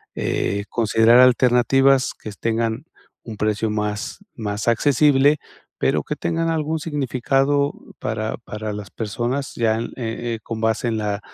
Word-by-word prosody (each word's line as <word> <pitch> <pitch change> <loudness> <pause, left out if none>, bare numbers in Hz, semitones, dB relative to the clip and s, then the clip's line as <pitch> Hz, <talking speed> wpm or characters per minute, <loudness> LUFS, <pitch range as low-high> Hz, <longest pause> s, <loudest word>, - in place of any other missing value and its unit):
eh, 100 +1 -1
considerar 115 +1 +4
alternativas 125 +1 +4
que 110 - -9
tengan 115 +3 -1 0.4
un 115 - -7
precio 110 +1 0
más 105 -1 -3 0.2
más 105 -1 -4
accesible, 145 +4 +4 0.4
pero - - +1
que - - -4
tengan 165 0 -1
algún 160 0 -1
significado 140 -1 0 0.3
para - - -3
para 105 0 -6
las 105 -1 -7
personas 120 +5 -3
ya 110 -1 +1
en, 115 - -2
eh 115 -1 -3
eh, - - -9
con 115 -1 -5
base 110 +1 0
en 110 - -1
la 105 -1 -2
120 Hz, 145 wpm, -21 LUFS, 110-135 Hz, 0.4 s, considerar